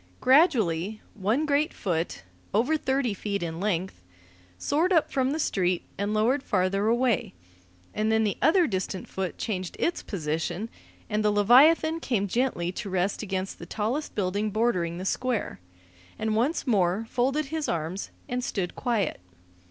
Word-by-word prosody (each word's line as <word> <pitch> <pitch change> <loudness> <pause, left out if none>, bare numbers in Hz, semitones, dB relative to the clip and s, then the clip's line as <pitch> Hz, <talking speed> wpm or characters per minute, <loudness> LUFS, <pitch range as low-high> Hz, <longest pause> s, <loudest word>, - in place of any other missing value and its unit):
Gradually, 220 - +3
one 215 +9 0
great 300 +2 +2
foot, 165 - -2 0.3
over 250 +9 +3
thirty 265 -6 0
feet 200 -1 -3
in 165 -1 -4
length, 190 - -2 0.6
soared 320 - +1
up 330 -4 +3
from 260 -1 +1
the 295 - -1
street 185 - 0
and 200 +1 -2
lowered 230 +6 +2
farther 195 -2 +1
away, 235 - +1 0.6
and 215 +1 0
then 220 0 +3
the 205 -2 0
other 350 +2 +5
distant 190 - -3
foot 190 -2 -4
changed 185 -5 -3
its 340 - 0
position; 175 +4 -3 0.4
and 215 0 0
the 210 - +4
leviathan 275 +10 +5
came 215 -10 0
gently 200 -6 0
to 195 +2 -6
rest 185 +1 0
against 190 -2 -3
the - - -9
tallest 235 +8 -2
building 205 +2 0
bordering 200 -6 0
the 185 - -5
Square, 245 - -1 0.6
and 220 0 -1
once 255 +9 +1
more 200 -3 +2
folded 270 +6 0
his 315 -2 -1
arms 170 +4 -3 0.2
and 245 0 -2
stood 190 -7 -3
quiet. 235 -6 -1
215 Hz, 150 wpm, -27 LUFS, 185-255 Hz, 0.6 s, other